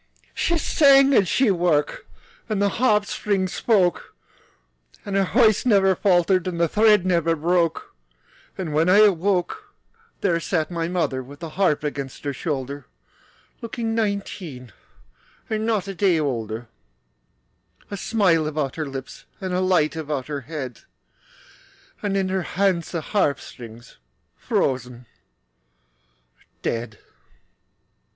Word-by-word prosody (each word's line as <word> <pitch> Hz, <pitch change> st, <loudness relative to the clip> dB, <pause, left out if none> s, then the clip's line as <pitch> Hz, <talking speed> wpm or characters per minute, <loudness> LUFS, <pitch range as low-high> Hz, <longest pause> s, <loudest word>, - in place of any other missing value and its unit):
She 340 Hz, -, 0 dB
sang 275 Hz, -3 st, +5 dB
as 195 Hz, -7 st, +4 dB
she 255 Hz, +1 st, +3 dB
worked, 170 Hz, -5 st, 0 dB, 0.4 s
And 215 Hz, -2 st, -1 dB
the 200 Hz, 0 st, +2 dB
harp 210 Hz, -2 st, +2 dB
strings 195 Hz, -3 st, -1 dB
spoke; 190 Hz, -7 st, +1 dB, 0.9 s
Her 195 Hz, -1 st, +1 dB
voice 220 Hz, +1 st, +3 dB
never 200 Hz, -6 st, +4 dB
faltered, 185 Hz, -1 st, +2 dB
And 175 Hz, -2 st, -3 dB
the 170 Hz, -, +3 dB
thread 210 Hz, +1 st, +4 dB
never 170 Hz, -2 st, +2 dB
broke. 170 Hz, +1 st, 0 dB, 0.6 s
And 170 Hz, -5 st, -4 dB
when 160 Hz, +4 st, +2 dB
I 190 Hz, -, +6 dB
awoke,– 205 Hz, -, +1 dB, 0.5 s
There 175 Hz, -4 st, +1 dB
sat 165 Hz, -1 st, -2 dB
my 165 Hz, -1 st, -2 dB
mother 170 Hz, -7 st, -1 dB
With 140 Hz, +3 st, -12 dB
the 165 Hz, -, -6 dB
harp 180 Hz, -6 st, +1 dB
against 140 Hz, -3 st, -5 dB
her 140 Hz, -1 st, -2 dB
shoulder 140 Hz, -1 st, -4 dB, 0.7 s
Looking 230 Hz, -1 st, -3 dB
nineteen 195 Hz, -, -4 dB, 0.8 s
And 220 Hz, 0 st, -1 dB
not 210 Hz, -4 st, 0 dB
a 195 Hz, -, -4 dB
day 185 Hz, -3 st, +2 dB
older, 115 Hz, -5 st, -3 dB, 1.2 s
A -, -, -3 dB
smile 190 Hz, -7 st, +1 dB
about 150 Hz, -3 st, -3 dB
her 155 Hz, -2 st, -3 dB
lips, 135 Hz, -1 st, -8 dB
And 185 Hz, -2 st, -4 dB
a 180 Hz, -, +1 dB
light 180 Hz, -5 st, +2 dB
about 150 Hz, -4 st, -3 dB
her 145 Hz, -1 st, -5 dB
head, 135 Hz, -4 st, -7 dB, 1.2 s
And 200 Hz, -2 st, -1 dB
her 190 Hz, 0 st, -1 dB
hands 180 Hz, -2 st, 0 dB
in 175 Hz, -, -2 dB
the -, -, -3 dB
harp 150 Hz, -7 st, 0 dB
strings 115 Hz, -1 st, -12 dB, 0.4 s
Frozen 125 Hz, -2 st, -2 dB, 1.6 s
dead. 115 Hz, -2 st, -3 dB
175 Hz, 130 wpm, -23 LUFS, 150-200 Hz, 1.6 s, I